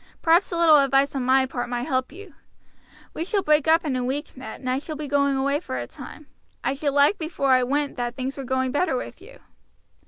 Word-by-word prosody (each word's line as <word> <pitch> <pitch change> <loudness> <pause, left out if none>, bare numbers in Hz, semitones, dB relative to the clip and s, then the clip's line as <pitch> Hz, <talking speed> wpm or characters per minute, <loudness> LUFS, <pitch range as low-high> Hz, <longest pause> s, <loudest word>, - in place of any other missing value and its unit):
Perhaps 335 +4 +3
a 340 - -2
little 325 -3 +6
advice 275 0 +2
on 265 - -1
my 260 +1 +3
part 245 -2 -5
might 240 0 -2
help 260 -3 -1
you. 375 +1 -12 0.8
We 320 - -3
shall 390 +2 -1
break 300 0 +2
up 325 +1 +4
in 280 -4 -1
a 250 - -1
week, 280 +4 -4
Ned, 255 -4 -9
and 255 - -8
I 255 +1 0
shall 310 +2 -7
be 300 0 -6
going 280 -1 +1
away 280 +2 0
for 215 - -6
a 120 - -4
time. 305 - -11 0.4
I 270 - 0
should 280 0 -2
like 285 0 +5
to 410 - -16
think 315 -1 -4
before 275 -5 0
I 255 0 +5
went 280 +3 -1
that 240 0 -3
things 265 +1 -4
were 275 - -6
going 260 0 -1
on - - -4
better 290 0 0
with 255 - -6
you." - - -14
280 Hz, 255 wpm, -24 LUFS, 260-310 Hz, 0.8 s, little